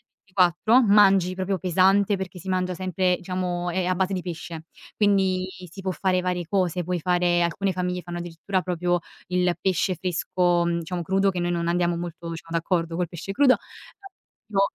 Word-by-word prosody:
il -, -, -49 dB
24 190 Hz, +6 st, +3 dB
mangi 195 Hz, -4 st, +5 dB
proprio 190 Hz, +1 st, -2 dB
pesante, 190 Hz, +4 st, +3 dB
perché 190 Hz, -1 st, -6 dB
si 185 Hz, +2 st, -10 dB
mangia 185 Hz, -1 st, 0 dB
sempre 185 Hz, 0 st, 0 dB
diciamo 180 Hz, -1 st, -3 dB
è 185 Hz, +1 st, -1 dB
a 185 Hz, +1 st, +1 dB
base 190 Hz, +1 st, 0 dB
di 180 Hz, -, -3 dB
pesce, 165 Hz, -2 st, -7 dB, 0.3 s
quindi 190 Hz, -3 st, +2 dB, 0.2 s
si 195 Hz, -, -10 dB
può 190 Hz, -, -1 dB
fare 185 Hz, 0 st, +1 dB
varie 180 Hz, -1 st, -2 dB
cose, 180 Hz, -1 st, 0 dB
puoi 180 Hz, 0 st, -2 dB
fare 175 Hz, 0 st, +2 dB
alcune 190 Hz, +3 st, 0 dB
famiglie 180 Hz, 0 st, -2 dB
fanno 175 Hz, +1 st, -6 dB
addirittura 175 Hz, +2 st, -3 dB
proprio 175 Hz, 0 st, 0 dB, 0.3 s
il 180 Hz, -1 st, +1 dB
pesce 185 Hz, 0 st, 0 dB
fresco, 175 Hz, 0 st, +1 dB
mhmm, 170 Hz, 0 st, 0 dB
diciamo 175 Hz, +1 st, -4 dB
crudo, 195 Hz, +3 st, +2 dB
che 180 Hz, -2 st, -3 dB
noi 175 Hz, 0 st, 0 dB
non 170 Hz, -1 st, -1 dB
andiamo 175 Hz, 0 st, +1 dB
molto, 170 Hz, 0 st, -6 dB
diciamo, 165 Hz, 0 st, -5 dB
d'accordo 165 Hz, -1 st, -1 dB
col 175 Hz, -1 st, -1 dB
pesce 175 Hz, +3 st, -6 dB
crudo. 260 Hz, +4 st, +5 dB, 0.9 s
Io 195 Hz, -2 st, +1 dB
180 Hz, 185 wpm, -24 LUFS, 175-190 Hz, 0.9 s, mangi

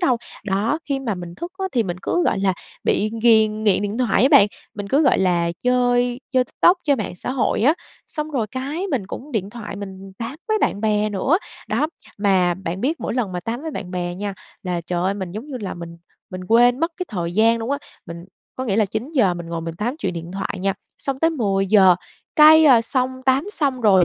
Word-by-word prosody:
đâu. 260 Hz, -9 st, +3 dB, 0.3 s
Đó, 210 Hz, +9 st, 0 dB
khi 275 Hz, -2 st, -1 dB
mà 235 Hz, -7 st, -2 dB
mình 175 Hz, -1 st, -8 dB
thức 345 Hz, -, -7 dB
á, 385 Hz, -, -2 dB
thì 240 Hz, -3 st, +2 dB
mình 180 Hz, -3 st, -4 dB
cứ, 350 Hz, -, +1 dB
gọi -, -, +1 dB
là, 195 Hz, -1 st, +2 dB, 0.3 s
bị 215 Hz, +1 st, +1 dB
ghiền 220 Hz, -2 st, +4 dB
nghiện 205 Hz, -1 st, +3 dB
điện 205 Hz, +4 st, -3 dB
thoại 245 Hz, -3 st, +2 dB
á 265 Hz, -, +6 dB
bạn, 200 Hz, -, +8 dB, 0.3 s
mình 205 Hz, -1 st, -6 dB
cứ, 285 Hz, +7 st, +3 dB
gọi 270 Hz, -, +4 dB
là, 175 Hz, -2 st, +2 dB
chơi 245 Hz, 0 st, +2 dB
chơi 255 Hz, -1 st, +3 dB
TikTok, 350 Hz, +8 st, +3 dB
chơi 285 Hz, -2 st, +3 dB
mạng 205 Hz, -5 st, -4 dB
xã 180 Hz, -, -4 dB
hội 250 Hz, -4 st, 0 dB
á, 295 Hz, +6 st, +5 dB, 0.3 s
xong 305 Hz, 0 st, -5 dB
rồi 240 Hz, -7 st, -1 dB
cái, 280 Hz, -, -4 dB
mình 230 Hz, -9 st, -1 dB
cũng 275 Hz, +7 st, -8 dB
điện 200 Hz, -3 st, -2 dB
thoại 210 Hz, -3 st, -7 dB
mình 195 Hz, -1 st, -8 dB
tám 235 Hz, +5 st, -5 dB
với 435 Hz, 0 st, +2 dB
bạn 200 Hz, -, 0 dB
bè 215 Hz, -1 st, +1 dB
nữa, 235 Hz, -, +1 dB, 0.3 s
đó, 305 Hz, -, +1 dB, 0.3 s
mà 185 Hz, -4 st, +3 dB
bạn 185 Hz, 0 st, -5 dB
biết 300 Hz, +6 st, -1 dB
mỗi -, -, -3 dB
lần 220 Hz, -7 st, -1 dB
mà 180 Hz, -, -3 dB
tám 235 Hz, -, -4 dB
với 320 Hz, -, -4 dB
bạn 185 Hz, -10 st, -6 dB
bè 175 Hz, -1 st, -3 dB
nha 200 Hz, +1 st, -4 dB, 0.3 s
là 180 Hz, -2 st, -2 dB
trời 175 Hz, +1 st, -3 dB
ơi, 195 Hz, +2 st, +1 dB
mình 190 Hz, -3 st, -5 dB
giống 220 Hz, +8 st, -6 dB
như 275 Hz, -4 st, -6 dB
là 195 Hz, -, -4 dB
mình 170 Hz, -1 st, -9 dB, 0.3 s
mình 185 Hz, 0 st, -6 dB
quên 245 Hz, +4 st, +5 dB
mất 330 Hz, +1 st, 0 dB
cái 365 Hz, -, -4 dB
thời 175 Hz, -5 st, -3 dB
gian 225 Hz, +3 st, +4 dB
luôn 225 Hz, +4 st, -4 dB
á. 280 Hz, -, 0 dB, 0.3 s
Mình 170 Hz, +1 st, -8 dB, 0.3 s
có 260 Hz, -, -3 dB
nghĩa 205 Hz, -4 st, 0 dB
là 220 Hz, -, +4 dB
9 230 Hz, -, -5 dB
giờ 205 Hz, -, +3 dB
mình 170 Hz, -1 st, -7 dB
ngồi 165 Hz, 0 st, -4 dB
mình 165 Hz, 0 st, -5 dB
tám 240 Hz, -, -3 dB
chuyện 320 Hz, -, -2 dB
điện 170 Hz, 0 st, -7 dB
thoại 195 Hz, 0 st, -4 dB
nha, 195 Hz, 0 st, +1 dB, 0.3 s
xong 270 Hz, -1 st, -3 dB
tới 325 Hz, +2 st, +3 dB
10 195 Hz, -9 st, 0 dB
giờ, 190 Hz, -3 st, +6 dB, 0.4 s
cái, 315 Hz, +1 st, +8 dB
ờ, 250 Hz, -6 st, +7 dB
xong 255 Hz, +2 st, 0 dB, 0.2 s
tám 265 Hz, +3 st, +3 dB
xong 275 Hz, -9 st, -1 dB
rồi, 190 Hz, -5 st, +5 dB
220 Hz, 240 wpm, -21 LUFS, 190-260 Hz, 0.4 s, bạn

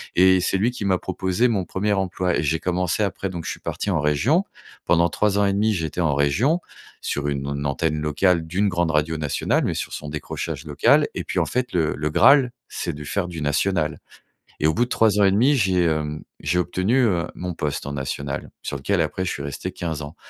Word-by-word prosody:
et 95 Hz, +1 st, +6 dB
c'est 95 Hz, +2 st, 0 dB
lui 110 Hz, +6 st, +1 dB
qui 110 Hz, -5 st, -5 dB
m'a 95 Hz, -1 st, +3 dB
proposé 95 Hz, +5 st, 0 dB
mon 100 Hz, -5 st, 0 dB
1er 105 Hz, +4 st, -1 dB
emploi 95 Hz, -2 st, 0 dB
et -, -, 0 dB
j'ai 80 Hz, +2 st, +1 dB
commencé 90 Hz, +3 st, 0 dB
après, 95 Hz, 0 st, -4 dB
donc 85 Hz, -3 st, -6 dB
je -, -, -3 dB
suis -, -, -7 dB
parti -, -, -4 dB
en 85 Hz, -5 st, +1 dB
région 75 Hz, -, +2 dB, 0.4 s
pendant 85 Hz, 0 st, +3 dB
3 105 Hz, -1 st, +1 dB
ans 100 Hz, -, +4 dB
et 100 Hz, -, +2 dB
1/2, 105 Hz, +2 st, +2 dB
j'étais 80 Hz, -1 st, -2 dB
en 75 Hz, -4 st, +2 dB
région 90 Hz, -, +2 dB, 0.4 s
sur 75 Hz, 0 st, -2 dB
une 70 Hz, -1 st, -3 dB
an 70 Hz, 0 st, -3 dB
antenne 75 Hz, +2 st, 0 dB
locale 80 Hz, +3 st, +2 dB
d'une 95 Hz, +5 st, 0 dB
grande 85 Hz, -2 st, 0 dB
radio 80 Hz, +1 st, +1 dB
nationale 75 Hz, -2 st, 0 dB
mais -, -, 0 dB
sur -, -, -4 dB
son 75 Hz, -, -6 dB
décrochage 75 Hz, +1 st, -5 dB
local 75 Hz, -1 st, +3 dB
et -, -, -3 dB
puis, -, -, -2 dB
en -, -, +2 dB
fait, 125 Hz, 0 st, -1 dB
le 80 Hz, -3 st, +1 dB
le 75 Hz, +1 st, -2 dB
graal, 125 Hz, -, +6 dB, 0.2 s
c'est 85 Hz, -, -4 dB
de 75 Hz, 0 st, -8 dB
faire 90 Hz, +5 st, -2 dB
du 85 Hz, -3 st, -6 dB
national 75 Hz, +1 st, 0 dB, 0.6 s
et -, -, 0 dB
au 80 Hz, -, +2 dB
bout 120 Hz, -, +2 dB
de -, -, -15 dB
3 110 Hz, -4 st, +3 dB
ans 100 Hz, -, +5 dB
et 95 Hz, -, +4 dB
1/2, 125 Hz, +9 st, +4 dB
j'ai, 95 Hz, -7 st, +2 dB
hem, 75 Hz, -2 st, -1 dB, 0.2 s
j'ai 90 Hz, -, 0 dB
obtenu, 95 Hz, +7 st, +1 dB
heu, 90 Hz, -5 st, +1 dB
mon 90 Hz, 0 st, -4 dB
poste 75 Hz, -4 st, -3 dB
en 70 Hz, -, -4 dB
national 70 Hz, 0 st, -4 dB
sur 70 Hz, -, -3 dB
lequel 90 Hz, +7 st, 0 dB
après, 80 Hz, +4 st, -2 dB
je -, -, -1 dB
suis 70 Hz, -, -5 dB
resté 70 Hz, +6 st, -5 dB
15 80 Hz, -5 st, -4 dB
ans 75 Hz, +3 st, -8 dB
90 Hz, 230 wpm, -23 LUFS, 75-100 Hz, 0.6 s, et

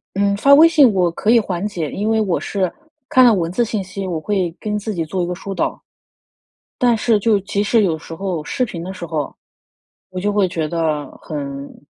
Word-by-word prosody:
嗯， 200 Hz, 0 st, +1 dB
发 275 Hz, +7 st, +4 dB
微 320 Hz, +3 st, +8 dB
信 290 Hz, -9 st, +5 dB
我 180 Hz, -3 st, +2 dB
可 210 Hz, -, 0 dB
以 235 Hz, -, +6 dB
缓 190 Hz, -2 st, -2 dB
解， 170 Hz, -8 st, -3 dB
因 210 Hz, +2 st, -2 dB
为 220 Hz, 0 st, +2 dB
我 190 Hz, -5 st, 0 dB
是 190 Hz, -3 st, -2 dB, 0.4 s
看 255 Hz, -1 st, +5 dB
了 235 Hz, -, +7 dB
文 170 Hz, -3 st, -1 dB
字 240 Hz, +4 st, +1 dB
信 215 Hz, -3 st, -2 dB
息， 190 Hz, +1 st, -6 dB
我 165 Hz, -3 st, -2 dB
会 185 Hz, -2 st, -1 dB
跟 210 Hz, -1 st, -2 dB
自 215 Hz, +1 st, -4 dB
己 165 Hz, -4 st, -2 dB
做 180 Hz, +3 st, -2 dB
一 -, -, -1 dB
个 180 Hz, -, -3 dB
疏 195 Hz, +2 st, -6 dB
导。 -, -, -2 dB, 1.0 s
但 240 Hz, -2 st, +3 dB
是 220 Hz, 0 st, +2 dB
就 215 Hz, -1 st, +3 dB
即 200 Hz, +1 st, -2 dB
使 220 Hz, +1 st, +3 dB
有 165 Hz, -4 st, +1 dB
时 165 Hz, -, -9 dB
候 180 Hz, -3 st, -3 dB
视 255 Hz, -, -1 dB
频 170 Hz, -7 st, -6 dB
的 185 Hz, +2 st, -6 dB
时 175 Hz, -2 st, -7 dB
候， 155 Hz, -2 st, -3 dB, 0.8 s
我 185 Hz, 0 st, -5 dB
就 205 Hz, +1 st, 0 dB
会 200 Hz, -3 st, +2 dB
觉 165 Hz, -3 st, -2 dB
得 155 Hz, -3 st, -1 dB, 0.2 s
很 140 Hz, -1 st, -7 dB
195 Hz, 240 characters per minute, -19 LUFS, 170-215 Hz, 1.0 s, 微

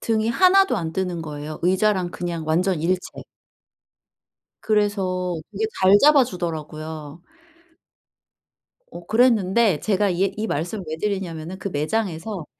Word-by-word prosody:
등이 220 Hz, 0 st, 0 dB
하나도 380 Hz, +8 st, +4 dB
안 160 Hz, -1 st, -3 dB
뜨는 180 Hz, -2 st, -2 dB
거예요. 150 Hz, 0 st, -7 dB
의자랑 185 Hz, 0 st, +1 dB
그냥 170 Hz, -2 st, -4 dB
완전 175 Hz, +1 st, +1 dB
일체. 180 Hz, +2 st, -2 dB, 1.4 s
그래서 195 Hz, -4 st, 0 dB, 0.2 s
되게 210 Hz, +2 st, -2 dB, 0.2 s
잘 190 Hz, +2 st, +7 dB
잡아주더라고요. 160 Hz, -, 0 dB, 1.7 s
어 175 Hz, 0 st, -11 dB
그랬는데 220 Hz, -, +3 dB
제가 205 Hz, -1 st, +1 dB
이 180 Hz, +2 st, -1 dB
얘 -, -, +4 dB
이 215 Hz, +1 st, -2 dB
말씀을 175 Hz, +5 st, -3 dB
왜 155 Hz, -, -3 dB
드리냐면은 185 Hz, -3 st, -4 dB
그 200 Hz, -, -4 dB
매장에서 180 Hz, +2 st, -3 dB
185 Hz, 270 characters per minute, -22 LUFS, 165-210 Hz, 1.7 s, 잘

